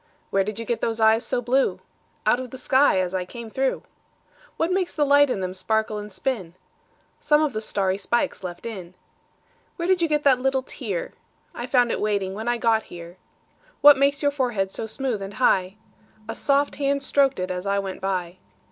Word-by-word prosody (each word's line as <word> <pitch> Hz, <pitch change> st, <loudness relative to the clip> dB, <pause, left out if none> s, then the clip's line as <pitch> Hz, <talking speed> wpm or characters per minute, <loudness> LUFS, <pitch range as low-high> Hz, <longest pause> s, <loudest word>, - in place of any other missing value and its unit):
Where 195 Hz, 0 st, +3 dB
did 210 Hz, +1 st, -5 dB
you 230 Hz, -, -5 dB
get 235 Hz, +1 st, -2 dB
those 225 Hz, 0 st, -1 dB
eyes 220 Hz, +1 st, +4 dB
so 245 Hz, -, -2 dB
blue? 260 Hz, +3 st, +1 dB, 0.5 s
Out 245 Hz, -, +3 dB
of 255 Hz, -1 st, -6 dB
the 260 Hz, -, -9 dB
sky 260 Hz, -5 st, +3 dB
as 185 Hz, 0 st, -1 dB
I 185 Hz, -1 st, -1 dB
came 230 Hz, +4 st, -9 dB
through. 265 Hz, +2 st, -1 dB, 0.7 s
What 330 Hz, +2 st, 0 dB
makes 370 Hz, -2 st, -1 dB
the 295 Hz, -, +2 dB
light 285 Hz, 0 st, +5 dB
in 195 Hz, -, -1 dB
them 185 Hz, 0 st, -3 dB
sparkle 215 Hz, +3 st, -1 dB
and 210 Hz, 0 st, -8 dB
spin? 190 Hz, -6 st, -3 dB, 0.6 s
Some 295 Hz, 0 st, +3 dB
of 295 Hz, -4 st, -1 dB
the 215 Hz, -, -3 dB
starry 195 Hz, -3 st, -1 dB
spikes 240 Hz, +3 st, -1 dB
left 175 Hz, +1 st, -7 dB
in. 185 Hz, -6 st, -7 dB, 0.8 s
Where 340 Hz, -1 st, -3 dB
did 370 Hz, -1 st, +3 dB
you 335 Hz, -, +3 dB
get 300 Hz, -1 st, 0 dB
that 265 Hz, -3 st, +4 dB
little 265 Hz, 0 st, +1 dB
tear?I -, -, -7 dB
found 245 Hz, -3 st, +3 dB
it -, -, -2 dB
waiting 200 Hz, -3 st, 0 dB
when 220 Hz, +3 st, -6 dB
I 240 Hz, 0 st, +1 dB
got 225 Hz, -1 st, +2 dB
here. 170 Hz, +1 st, -10 dB, 0.6 s
What 290 Hz, 0 st, +9 dB
makes 280 Hz, +1 st, +1 dB
your 285 Hz, -, +3 dB
forehead 240 Hz, -9 st, -1 dB
so 220 Hz, -, -4 dB
smooth 235 Hz, -1 st, -3 dB
and 195 Hz, +1 st, -7 dB
high?A 215 Hz, +1 st, -2 dB
soft 280 Hz, +4 st, +1 dB
hand 280 Hz, -1 st, 0 dB
strok'd 275 Hz, -4 st, +2 dB
it 185 Hz, 0 st, -2 dB
as 180 Hz, +2 st, -4 dB
I 200 Hz, 0 st, +1 dB
went 195 Hz, -1 st, -4 dB
by. 185 Hz, -2 st, -2 dB
230 Hz, 200 wpm, -24 LUFS, 195-275 Hz, 0.8 s, What